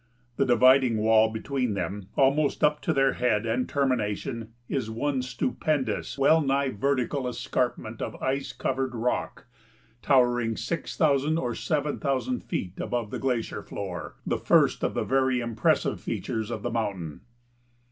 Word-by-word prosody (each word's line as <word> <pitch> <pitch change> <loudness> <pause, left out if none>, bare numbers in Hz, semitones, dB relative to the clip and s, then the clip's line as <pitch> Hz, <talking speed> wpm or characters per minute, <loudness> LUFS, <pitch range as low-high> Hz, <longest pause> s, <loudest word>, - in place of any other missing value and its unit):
The 135 - +2
dividing 130 -1 +5
wall 110 +1 +4
between 120 0 -2
them, 95 +1 -4
almost 140 +3 +2
up 150 0 +3
to - - 0
their 135 -1 +3
head 115 -3 +1
and 115 +3 -1
termination, 115 -3 -1 0.2
is 130 -6 -2
one 130 +4 -1
stupendous, 130 - -2
well 155 +4 +5
nigh 135 -1 +1
vertical 130 +2 -1
escarpment 120 -2 -2
of - - -4
ice 135 +1 -2
covered 130 -1 -2
rock 120 +2 -2 0.6
towering 120 -4 +3
six 155 +8 -4
thousand 150 0 +3
or 125 -6 -1
seven 150 +1 -1
thousand 145 - -1
feet 95 - -4
above 115 -4 -2
the - - -4
glacier 125 -4 -1
floor, 90 -4 -6
the - - -1
first - - +3
of - - 0
the - - 0
very 130 -1 +2
impressive 115 -2 0
features 110 -1 -3
of 120 - -5
the 120 - -2
mountain. 100 -9 -3
125 Hz, 145 wpm, -27 LUFS, 115-140 Hz, 0.6 s, dividing